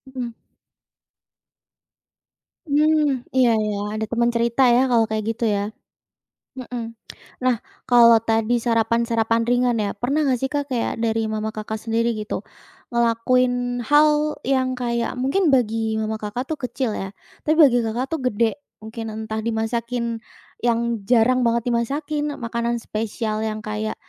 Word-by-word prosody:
Mhm. 240 Hz, -3 st, -4 dB, 2.3 s
Hmm, 300 Hz, -2 st, +2 dB
iya 255 Hz, -2 st, +5 dB
iya, 210 Hz, -1 st, -1 dB, 0.2 s
ada 220 Hz, 0 st, -2 dB
temen 235 Hz, 0 st, +1 dB
cerita 235 Hz, +2 st, +2 dB
ya 260 Hz, +2 st, +3 dB
kalau 230 Hz, -2 st, +4 dB
kayak 215 Hz, 0 st, -1 dB
gitu 230 Hz, -, -2 dB
ya? 205 Hz, -1 st, 0 dB, 0.9 s
Mhm. 240 Hz, -2 st, -5 dB, 0.5 s
Nah, 255 Hz, -1 st, +2 dB, 0.3 s
kalau 235 Hz, -2 st, +7 dB
tadi 225 Hz, +1 st, +1 dB
sarapan-sarapan 230 Hz, 0 st, +1 dB
ringan 245 Hz, -1 st, +2 dB
ya, 205 Hz, -2 st, -2 dB
pernah 255 Hz, +8 st, -1 dB
nggak 255 Hz, -2 st, +1 dB
sih 265 Hz, -, 0 dB
Kak, 285 Hz, -1 st, -1 dB
kayak 240 Hz, -2 st, -2 dB
dari 225 Hz, -1 st, 0 dB
mama 215 Hz, 0 st, -2 dB
Kakak 215 Hz, 0 st, -4 dB
sendiri 230 Hz, +1 st, 0 dB
gitu, 215 Hz, -2 st, -4 dB, 0.5 s
ngelakuin 245 Hz, +1 st, +1 dB
hal 300 Hz, +1 st, +4 dB
yang 260 Hz, -1 st, +1 dB
kayak 235 Hz, -1 st, -2 dB
mungkin 275 Hz, +9 st, +1 dB
bagi 225 Hz, -5 st, +1 dB
mama 220 Hz, 0 st, -2 dB
Kakak 210 Hz, +4 st, -4 dB
tuh 310 Hz, -, -3 dB
kecil 250 Hz, -1 st, -2 dB
ya, 195 Hz, -, -4 dB, 0.4 s
tapi 310 Hz, -, +4 dB
bagi 270 Hz, -7 st, +6 dB
Kakak 230 Hz, +3 st, -2 dB
tuh 325 Hz, -, -1 dB
gede? 230 Hz, +4 st, 0 dB, 0.2 s
Mungkin 225 Hz, +1 st, -6 dB
entah 220 Hz, 0 st, -4 dB
dimasakin 230 Hz, +1 st, -2 dB, 0.4 s
yang 235 Hz, -1 st, +1 dB, 0.3 s
jarang 245 Hz, +2 st, +4 dB
banget 235 Hz, 0 st, +1 dB
dimasakin, 290 Hz, +5 st, -1 dB
makanan 235 Hz, 0 st, -2 dB
spesial 215 Hz, 0 st, -3 dB
yang 215 Hz, -1 st, -4 dB
kayak 215 Hz, +1 st, -3 dB
235 Hz, 140 wpm, -22 LUFS, 225-255 Hz, 2.3 s, kalau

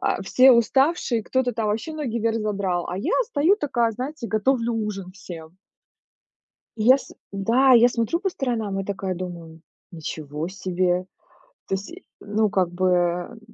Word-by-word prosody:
а, -, -, 0 dB
все 255 Hz, +6 st, +6 dB
уставшие, 250 Hz, 0 st, +2 dB
кто-то 260 Hz, -2 st, 0 dB
там 220 Hz, -1 st, -2 dB
вообще 220 Hz, +9 st, -2 dB
ноги 255 Hz, -7 st, -3 dB
вверх 225 Hz, 0 st, 0 dB
задрал, 195 Hz, -4 st, -1 dB
а 180 Hz, -, -3 dB
я -, -, -1 dB
стою 325 Hz, +7 st, +3 dB
такая, 240 Hz, -, 0 dB
знаете, 260 Hz, +3 st, -5 dB
готовлю 230 Hz, +3 st, +1 dB
ужин 205 Hz, -4 st, -4 dB
всем. 170 Hz, -4 st, -10 dB, 1.4 s
Я -, -, +4 dB
с -, -, -12 dB, 0.2 s
да 230 Hz, +7 st, +3 dB
я 240 Hz, 0 st, +7 dB
смотрю 235 Hz, +7 st, -1 dB
по 385 Hz, +1 st, -1 dB
сторонам 225 Hz, -, -2 dB
и -, -, -2 dB
такая 195 Hz, -2 st, -3 dB
думаю: 170 Hz, -3 st, -8 dB, 0.3 s
ничего 155 Hz, -1 st, -5 dB
себе! 185 Hz, -1 st, -1 dB, 0.6 s
То -, -, -17 dB
есть, 195 Hz, +2 st, -6 dB
и 360 Hz, +2 st, -12 dB, 0.2 s
ну 210 Hz, +1 st, 0 dB
как 190 Hz, -4 st, +1 dB
бы 185 Hz, +1 st, 0 dB
н 180 Hz, +5 st, 0 dB
210 Hz, 160 wpm, -23 LUFS, 185-245 Hz, 1.4 s, я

